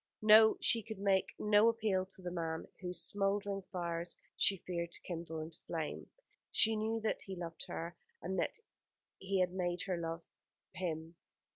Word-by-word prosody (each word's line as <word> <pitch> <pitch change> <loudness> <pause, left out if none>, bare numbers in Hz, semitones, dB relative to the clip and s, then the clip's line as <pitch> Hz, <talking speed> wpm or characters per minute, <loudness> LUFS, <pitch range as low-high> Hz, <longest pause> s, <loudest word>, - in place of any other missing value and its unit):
No, 220 +1 +8
she 230 - +3
could 220 0 -7
make 195 -1 +1
no 210 +2 +5
appeal 210 -5 +1
to 190 -1 -4
the 175 - -3
man 165 -2 -3
whose 180 -2 -3
smouldering 200 0 0
fires 170 -1 -2 0.2
she 195 - +4
feared 170 -1 -2
to - - -5
kindle 165 -2 -5
into 155 +1 -7
flame. 160 -3 -4 0.4
She 225 0 +4
knew 220 +1 0
that 220 - -1
he 195 - -6
loved 170 -2 -5
her, 170 +1 -5 0.2
and - - -2
that - - 0 0.6
he 190 0 0
had 180 0 +1
made 175 -1 -1
her 185 -3 -1
love 165 0 -4 0.5
him. 165 -2 -4
185 Hz, 165 wpm, -35 LUFS, 170-205 Hz, 0.6 s, No